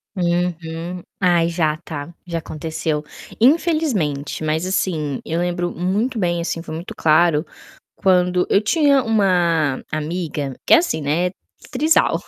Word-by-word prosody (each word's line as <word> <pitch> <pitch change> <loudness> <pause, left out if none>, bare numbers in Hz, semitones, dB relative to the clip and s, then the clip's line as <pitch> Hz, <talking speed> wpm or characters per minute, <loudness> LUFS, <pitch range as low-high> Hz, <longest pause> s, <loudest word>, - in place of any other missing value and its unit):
Uhum, 175 -1 -2 0.2
ah, 175 -3 +3
já 160 -3 0
tá, 155 -1 -7
já 170 -1 -2
aconteceu. 155 -1 -3 0.4
Infelizmente, 240 - +1
mas, 155 +3 0
assim, 155 -7 -1
eu 165 +2 -2
lembro 175 0 -1
muito 205 +8 -1
bem, 175 -3 0
assim, 170 0 -3
foi 155 - -7
muito 165 +3 -7
claro 155 0 +3 0.5
quando 180 -2 +2
eu 200 - +4
tinha 280 +3 +3
uma 175 - +2
amiga 155 -3 -3
que - - +5
é - - +10
assim, 335 - 0
né, 165 +5 0 0.4
trisal 310 +5 +2
175 Hz, 130 wpm, -20 LUFS, 155-190 Hz, 0.5 s, é